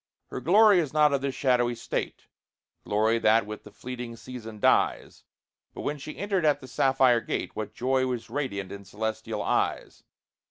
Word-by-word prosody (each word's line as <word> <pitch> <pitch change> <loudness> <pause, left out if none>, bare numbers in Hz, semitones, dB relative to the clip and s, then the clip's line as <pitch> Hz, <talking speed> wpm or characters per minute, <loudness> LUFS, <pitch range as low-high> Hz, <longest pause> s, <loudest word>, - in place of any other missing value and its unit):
Her - - -5
glory 205 +2 +6
is 150 -5 -2
not 150 -1 +4
of 140 - +1
this 140 -1 -2
shadowy 120 -3 +2
state, 115 - -4 0.6
Glory 110 +2 +2
that 110 0 +4
with 105 0 -8
the - - -12
fleeting 120 +2 -7
season 115 -3 -9
dies; - - +1 0.5
But - - -6
when 150 0 -3
she 145 +3 -8
entered 200 -3 -1
at 150 -2 +3
the 130 - -11
sapphire 130 -3 +3
gate - - -4
What 110 0 -5
joy 130 +1 +1
was 125 -2 -4
radiant 100 -10 -4
in 100 0 -8
celestial 110 +2 -4
eyes! - - -1
125 Hz, 170 wpm, -27 LUFS, 110-140 Hz, 0.6 s, glory